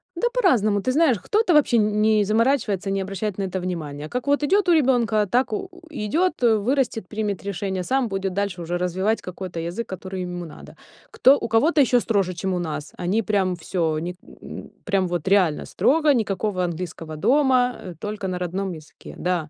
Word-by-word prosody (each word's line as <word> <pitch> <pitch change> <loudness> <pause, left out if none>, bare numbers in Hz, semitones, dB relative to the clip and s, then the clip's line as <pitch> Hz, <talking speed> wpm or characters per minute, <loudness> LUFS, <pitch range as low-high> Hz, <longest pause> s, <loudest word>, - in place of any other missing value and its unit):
Да 410 +8 +1
по-разному, 225 - +2
ты 255 - 0
знаешь, 285 -4 +3
кто-то 420 - +1
вообще 290 -5 +4
н 210 -1 +2
не 215 -1 +4
заморачивается 215 -3 +1
не 195 0 0
обращать 195 +1 -4
на 200 - -2
это 190 0 -3
внимания. 155 -5 -5
Как 250 0 -3
вот 285 +1 +2
идет 390 +6 +2
у 345 - +6
ребёнка, 235 -8 +2
так 245 +7 +1
у 390 -2 -3
у 355 0 -16
идет, 315 - 0
э, 225 -2 +5
вырастет, 235 -2 -1
примет 210 -2 -3
решение, 190 -1 -3
сам 260 +5 0
будет 195 -2 -3
дальше 195 -2 -2
уже 175 +1 -2
развивать 185 +5 0
какой-то 180 -1 -6
язык, 175 +8 -4
который 190 0 -6
ему 175 -1 -5
надо. 155 - -12 0.4
Кто 270 +2 +5
у - - -4
кого-то 290 +8 +3
ещё 250 -2 +4
строже, 200 -6 0
чем 190 +2 -3
у 180 - -1
нас. 155 -3 -5
Они 185 +6 +1
прям 195 -3 0
всё 175 +2 -5 0.2
у 155 - -1
них, 175 +2 -5
э, - - -10 0.2
прям 195 -3 +1
вот 175 -2 -3
реально 190 -6 +3
строго, 300 +1 +3
никакого 205 -4 -1
английского 165 -2 -4
дома, 250 - +3
э, 180 - -6
только 210 -2 -4
на 180 -1 -2
родном 185 +2 -3
языке. 155 -2 -12
Да. 175 -4 -1
200 Hz, 195 wpm, -23 LUFS, 180-245 Hz, 0.4 s, у